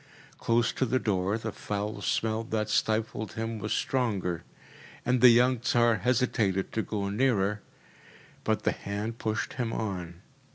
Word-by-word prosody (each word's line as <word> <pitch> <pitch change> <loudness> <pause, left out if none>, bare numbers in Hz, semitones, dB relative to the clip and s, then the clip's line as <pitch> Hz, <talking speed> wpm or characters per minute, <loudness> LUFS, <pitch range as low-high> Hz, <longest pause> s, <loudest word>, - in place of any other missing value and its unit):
Close 115 0 +2
to - - -1
the 130 0 +2
door, 100 -3 0
the 110 -1 -4
foul 105 +1 -4
smell 110 +2 0
that 110 -2 -2
stifled 110 0 0
him 110 0 -3
was 105 +1 -4
stronger, 100 -10 0 0.6
and 125 -1 +2
the 125 - +10
young 125 +1 +4
Tsar 120 -2 +3
hesitated 110 -4 +1
to 110 - 0
go 105 -2 -3
nearer, 105 -3 +1 0.8
but - - 0
the - - +3
hand 105 +3 -4
pushed 110 0 -2
him 120 -3 -2
on. 90 -5 -4
110 Hz, 150 wpm, -28 LUFS, 100-120 Hz, 0.8 s, the